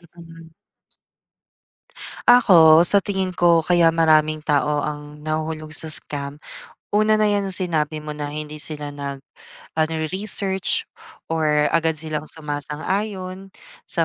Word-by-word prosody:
Mm. 165 -1 -14 1.8
Ako, 170 -10 +6
sa 200 +3 +6
tingin 190 -1 -3
ko 170 -2 +2
kaya 175 -1 +3
maraming 155 -2 +2
tao 150 -1 0
ang 150 0 -8
nahuhulog 155 0 -4
sa 160 - 0
scam, 145 -2 +3 0.5
una 215 +1 +1
na 215 - +2
yang 200 -2 -1
sinabi 160 -5 0
mo 150 0 -8
na 145 -1 -6
hindi 150 0 -3
sila 145 -2 -2
nag, 140 -1 -6 0.5
ah, 155 0 0
nare-research, 190 +4 -1 0.5
or 150 -2 0
agad 160 -1 0
silang 155 0 -5
sumasang-ayon, 185 +6 -5 0.4
sa 165 - +1
160 Hz, 120 wpm, -20 LUFS, 150-185 Hz, 1.8 s, Ako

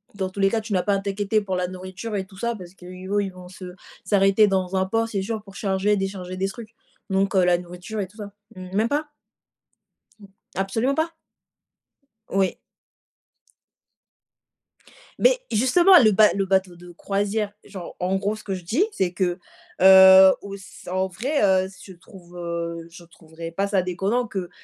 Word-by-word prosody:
dans 190 -2 -2
tous 200 - -10
les 195 0 +4
cas, 225 +1 -1
tu 215 -1 -6
n'as 180 - +1
pas 200 -1 +1
à - - 0
t'inquiéter 200 +2 -1
pour 190 -2 -3
la 180 0 -1
nourriture 185 +4 -7
et 190 - -2
tout 190 -1 -17
ça 235 +2 -2
parce 180 -2 -11
qu'eux, 180 -1 -12 0.3
ils 195 - -4
vont 180 0 -12
se 180 -1 -10 0.3
s'arrêter 200 +1 +4
dans 190 -1 -1
un 190 0 +1
port, 225 +3 0
c'est 195 -3 -2
sûr, 220 +2 -4
pour 195 -1 -15
charger, 200 +1 0
décharger 190 -1 -4
des 195 +1 0
trucs. 225 +1 -10 0.4
Donc 195 +1 0
heu, 185 -1 +4
la 175 -1 +4
nourriture 180 +4 -8
et 190 - -4
tout 210 +4 -22
ça. 205 -1 -8 0.2
M 185 0 -9
même 220 +3 +1
pas? 295 +1 -1 1.1
Mmh, 200 - -14 0.3
absolument 225 +8 0
pas? 325 +1 -1 1.2
Oui. 190 -1 0 2.6
Beh, - - +4
justement, 260 - +4
le 215 - +5
ba 210 +1 +6
le 195 -1 0
bateau 190 -2 0
de 175 0 -13
croisière, 200 +3 -2
genre, 190 -4 -9
en 185 +2 0
gros, 205 +2 -2
ce 215 - -12
que 195 - -4
je 180 -2 -7
dis, 255 - +2
c'est 180 - -1
que, 180 0 -1 0.4
heu, 190 0 +9
auss 200 -1 -11
en 190 0 0
vrai, 250 - -2
heu, 190 -1 +3
ce 195 0 -14
je - - -20
trouve, 175 0 -16
heu, 170 -1 -4
je 170 0 -14
trouverais 165 0 -10
pas 195 +4 -1
ça 200 -2 +1
déconnant 195 +7 -1
que, 190 -4 -5
195 Hz, 190 wpm, -23 LUFS, 185-210 Hz, 2.6 s, heu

